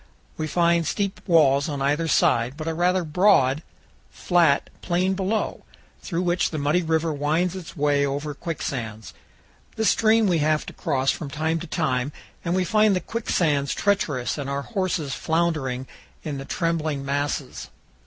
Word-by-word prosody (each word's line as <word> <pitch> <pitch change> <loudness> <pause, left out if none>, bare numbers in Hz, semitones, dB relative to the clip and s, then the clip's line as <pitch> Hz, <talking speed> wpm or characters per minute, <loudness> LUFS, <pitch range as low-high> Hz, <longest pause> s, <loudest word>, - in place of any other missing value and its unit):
We 155 - -3
find 170 +1 +2
steep 200 +2 -2
walls 145 -4 +4
on 145 -2 -3
either 145 +4 +1
side, 125 -3 +2
but 155 0 -5
a 165 - 0
rather 180 +2 +1
broad, 155 -4 +3 0.5
flat 170 -5 +2
plain 185 +2 +1
below, 195 +3 -2 0.4
through 175 -1 -2
which 175 0 +1
the 155 - -4
muddy 150 +4 +1
river 160 -1 0
winds 160 +5 0
its 180 -3 -9
way 145 -1 +2
over 145 +2 -2
quicksands. 120 - -5 0.6
This 220 -1 +2
stream 225 0 +3
we 175 -4 +2
have 155 0 +1
to - - -8
cross 135 0 0
from 150 - -5
time 160 +3 -1
to 175 - -7
time, 145 -5 -1 0.3
and 170 +1 0
we 185 - +2
find 215 0 +3
the - - +1
quicksands 160 -11 0
treacherous 165 -11 0
and 140 -1 -4
our 140 0 -2
horses 185 - -2
floundering 155 -7 -1 0.4
in 145 -3 -4
the 135 - -7
trembling 160 -5 -1
masses. 140 -1 -3
160 Hz, 160 wpm, -24 LUFS, 140-180 Hz, 0.6 s, walls